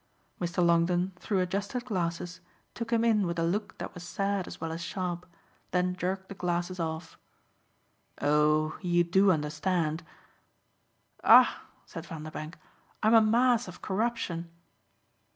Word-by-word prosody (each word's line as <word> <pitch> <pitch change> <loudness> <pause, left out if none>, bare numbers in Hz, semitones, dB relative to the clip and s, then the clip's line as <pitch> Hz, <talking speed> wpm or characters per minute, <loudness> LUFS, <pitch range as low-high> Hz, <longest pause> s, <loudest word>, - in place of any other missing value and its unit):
Mr. 175 0 0
Longdon, 175 +2 +2
through 195 -3 0
adjusted 200 +7 -2
glasses, 175 -5 -3 0.3
took 230 0 -5
him 230 0 +3
in 210 -5 +3
with 170 0 -3
a 165 - +1
look 205 +5 -2
that - - -6
was 180 - -9
sad 195 +2 -2
as - - -9
well 165 0 -3
as 165 +1 -5
sharp, 180 0 -4 0.4
then 180 0 +1
jerked 190 +1 -3
the - - -7
glasses 180 0 -2
off. 160 0 -4 1.0
"Oh 150 +1 +2
you 175 -2 +3
do 190 +4 +4
understand." 155 +1 0 1.2
"Ah," - - +6 0.2
said 165 -1 -8
Vanderbank, 155 0 -7 0.5
"I'm 220 +1 +5
a 225 - +8
mass 235 +1 +3
of 180 - -11
corruption!" 190 -5 -2
180 Hz, 135 wpm, -29 LUFS, 170-200 Hz, 1.2 s, a